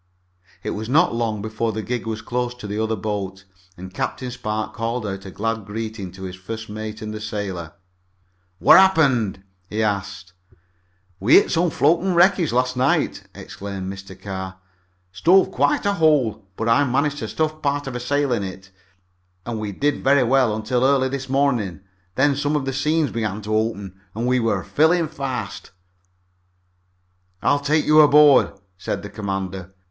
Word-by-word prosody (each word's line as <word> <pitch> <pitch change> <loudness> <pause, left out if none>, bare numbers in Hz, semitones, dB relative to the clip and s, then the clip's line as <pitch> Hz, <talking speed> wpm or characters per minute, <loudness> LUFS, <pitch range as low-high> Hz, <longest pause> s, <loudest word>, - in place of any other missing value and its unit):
It - - -3
was 110 +2 -5
not 160 +2 +4
long 110 -3 -2
before 110 +1 -2
the 110 +1 -4
gig 120 -1 -3
was 110 -1 -4
close 125 0 -2
to 125 - -10
the 105 +1 -3
other 110 0 0
boat, 95 -3 -4 0.3
and 95 +1 -9
Captain 125 +5 -3
Spark 110 -3 -4
called 115 0 -3
out 95 -1 -5
a - - -6
glad 115 +3 -3
greeting 105 -2 -6
to 95 0 -10
his 95 -1 -6
first 110 +4 -7
mate 110 +1 -6
and 110 0 -5
the 110 - -6
sailor. 95 -6 -5 0.8
"What 100 - +7
happened?" 135 - +3 0.3
he 110 +1 -1
asked. 100 -3 -3 0.9
"We 105 +7 +5
hit - - +5
some 175 0 +2
floating 170 +6 +2
wreckage 175 -1 +4
last 125 +1 +1
night," 130 +2 0
explained 95 -1 -6
Mr. 95 -1 -11
Carr. 95 -1 -6 0.5
"Stove 175 - +4
quite 145 +7 +1
a 200 - +2
hole, 150 - +2
but 115 - -2
I 115 +5 +4
managed 140 +2 0
to - - -4
stuff 155 0 -2
part 145 0 -1
of 135 -2 -5
a - - -2
sail 140 +2 0
in 115 - 0
it, 95 0 -8 0.7
and 115 -2 -4
we 105 -1 -4
did 145 +8 -1
very 135 0 +4
well 125 -3 +3
until 120 +3 -1
early 135 -1 +3
this 135 -1 -5
morning. 125 -10 0 0.3
Then 140 +1 +3
some 145 +2 -1
of 145 -3 -1
the 135 - -2
seams 150 +1 +1
began 110 -2 -3
to 110 +1 -1
open, 100 -4 -2
and 115 +2 -2
we're 125 -2 +1
filling 160 +1 +2
fast." 130 - -5 1.7
"I'll 145 - +3
take 150 +2 +1
you 155 0 +5
aboard," 150 -1 +6 0.3
said - - -3
the 105 - -7
commander. 95 -2 -5
115 Hz, 170 wpm, -22 LUFS, 100-140 Hz, 1.7 s, What